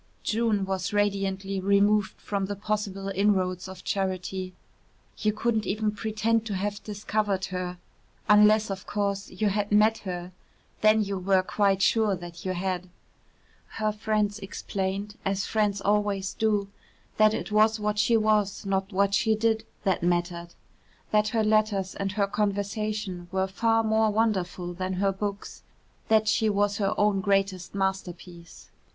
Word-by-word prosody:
June 220 -3 +1
was 190 0 -2
radiantly 195 -1 0
removed 200 +1 +2
from 200 -2 -2
the 205 - -3
possible 200 -1 -3
inroads 190 -2 +1
of 190 -1 -10
charity. 185 -1 -2 0.7
You 215 - +2
couldn't 220 -1 -1
even 215 +1 0
pretend 220 +1 0
to 205 - -2
have 205 +2 -3
discovered 205 -2 -1
her 180 0 -3 0.5
unless, 210 0 +5
of 190 -1 -6
course, 200 -1 -2
you 205 +3 0
had 205 +1 -1
met 215 +2 +4
her 180 -2 -6 0.5
then 215 0 +5
you 200 -1 -3
were 190 0 +2
quite 195 0 +1
sure 215 -2 +3
that 175 -1 -10
you 185 - -1
had. 185 0 -3 0.9
Her 215 -1 +1
friends 210 -1 -1
explained 195 +1 -4
as 195 +1 -1
friends 210 -2 0
always 205 -1 0
do 210 -2 +1 0.5
that 215 0 +5
it - - -5
was 215 +1 +4
what 210 0 -1
she 225 +2 +4
was, 215 -2 +1
not 195 0 -1
what 200 +1 +2
she 220 +2 +3
did, 220 0 0 0.2
that 190 -4 +1
mattered, 175 0 -1 0.6
that 210 0 +3
her 220 0 +1
letters 215 -3 +1
and 195 0 -3
her 205 -1 +2
conversation 205 -2 -2
were 190 0 +1
far 225 +4 +1
more 220 0 +2
wonderful 190 -5 -1
than 185 +1 -3
her 195 +1 +1
books, 200 +1 -5 0.5
that 220 -1 +3
she 220 0 +2
was 205 0 +1
her 195 -1 +1
own 205 -2 +2
greatest 195 -2 0
masterpiece. 180 -3 -5
200 Hz, 150 wpm, -27 LUFS, 190-215 Hz, 0.9 s, unless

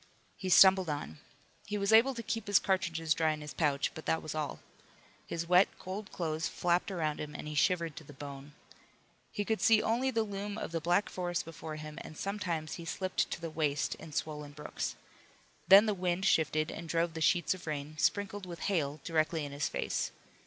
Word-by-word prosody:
He 190 - -4
stumbled 190 -1 +7
on. 145 - -4 0.5
He 210 - -2
was 200 +1 +1
able 250 +4 +6
to 230 - -5
keep 225 -2 -3
his 205 -1 +5
cartridges 165 -4 +1
dry 160 -1 +2
in 155 - -7
his 150 -1 -7
pouch, 145 -3 +1
but 160 - -9
that 160 - +1
was 155 - -5
all. 155 -2 -3 0.7
His 170 0 -3
wet, 180 +2 +6
cold 195 +2 -6
clothes 160 -3 -2
flapped 175 +2 0
around 155 -6 -2
him 150 0 -6
and - - -6
he 150 - -5
shivered 165 0 +1
to - - -7
the 145 - -13
bone. 140 0 -9 0.8
He 205 - -2
could 220 0 -1
see 225 -1 +6
only 235 +5 +1
the 230 -3 +1
loom 205 0 -5
of - - -4
the 165 -1 -2
black 175 +5 +2
forest 175 -2 -2
before 160 -1 -7
him, 155 0 -7
and 155 - -10
sometimes 175 -6 -3
he - - -8
slipped 185 +2 -1
to - - -4
the 165 -1 -5
waist 150 -2 0
in 160 - -11
swollen 150 -1 -4
brooks. 150 +1 -4 0.7
Then 195 +4 +9
the 215 - +1
wind 180 0 -1
shifted 155 -4 +2
and 165 -1 -7
drove 165 0 +1
the 160 - -5
sheets 175 +1 +3
of 185 -2 -11
rain, 150 0 -4
sprinkled 205 -1 0
with 170 -2 -8
hail, 155 -7 -1
directly 160 -1 0
in 145 - -7
his 145 +1 -1
face. - - -1
165 Hz, 205 wpm, -32 LUFS, 155-195 Hz, 0.8 s, Then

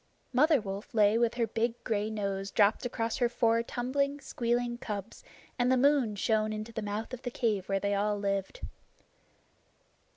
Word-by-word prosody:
Mother 300 +3 +5
Wolf 200 +1 -7
lay 215 +1 +4
with 235 0 +2
her 235 -1 +1
big 230 +1 -1
gray 215 -2 -1
nose 200 -2 -3
dropped 210 +5 +3
across 230 -2 -2
her 245 -2 +2
four 230 -1 +2
tumbling, 280 +4 -1
squealing 240 -2 -1
cubs, 205 -1 -6 0.4
and 245 +1 +3
the 260 - +4
moon 265 -5 +3
shone 215 +1 +1
into 215 +1 -5
the 220 - -3
mouth 210 +4 -4
of 255 - -6
the 245 - -3
cave 215 -6 -1
where 195 0 +1
they 200 +1 0
all 205 +1 +1
lived. 200 - -2
225 Hz, 170 wpm, -30 LUFS, 205-245 Hz, 0.4 s, Mother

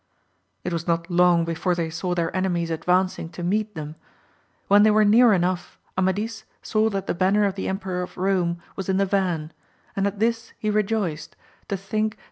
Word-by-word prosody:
It - - -3
was 170 0 -3
not 170 +1 -1
long 175 -1 +4
before 170 +2 -1
they 165 -2 -2
saw 175 +2 -2
their 170 0 -1
enemies 175 -3 0
ad 160 - -4
vancing 180 -2 +1
to 175 - -6
meet 210 +3 -1
them. 155 -1 -6 0.7
When 205 +1 +6
they 215 - +6
were 215 0 +4
near 230 +3 +6
enough, 180 -2 0 0.2
Amadis 200 +4 -1 0.2
saw 215 0 +2
that 195 -2 -3
the - - -1
banner 190 +4 +2
of 200 - 0
the 195 - -4
Emperor 190 -2 -2
of 180 - -7
Rome 180 -2 0 0.2
was 195 -1 -5
in 190 - +2
the 195 - +3
van; 180 -5 -1 0.4
and 195 0 +1
at 200 0 -4
this 230 +2 -1
he 215 - -1
rejoiced, 200 -7 -1 0.3
to 200 - -2
think 215 +3 -1
that - - -30
VOL. - - -31
190 Hz, 205 wpm, -24 LUFS, 175-205 Hz, 0.7 s, When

